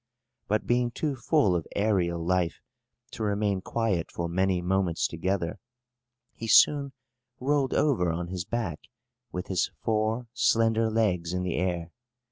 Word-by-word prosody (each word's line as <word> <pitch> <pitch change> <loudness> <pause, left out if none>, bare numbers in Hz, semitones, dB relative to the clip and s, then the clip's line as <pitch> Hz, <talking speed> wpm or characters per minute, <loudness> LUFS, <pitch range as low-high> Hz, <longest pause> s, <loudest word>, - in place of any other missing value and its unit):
But, 105 +1 0
being 120 0 +2
too 145 +3 -2
full 125 - +2
of 85 - -2
aërial 90 -5 +1
life 90 -1 +1 0.6
to - - -8
remain 100 -2 0
quiet 100 -6 -1
for 85 - -3
many 95 +1 +1
moments 90 -2 0
together, 95 +3 -2 0.7
he 115 - -7
soon 140 +3 +5 0.5
rolled 135 0 +1
over 115 - +2
on 85 +1 -3
his 90 -1 -3
back, 100 -7 -3 0.5
with 90 +1 -4
his 95 -2 0
four 110 +2 0
slender 115 -1 +2
legs 90 -6 0
in 90 0 -1
the 90 -2 -2
air. 85 -1 -1
95 Hz, 140 wpm, -27 LUFS, 90-115 Hz, 0.7 s, soon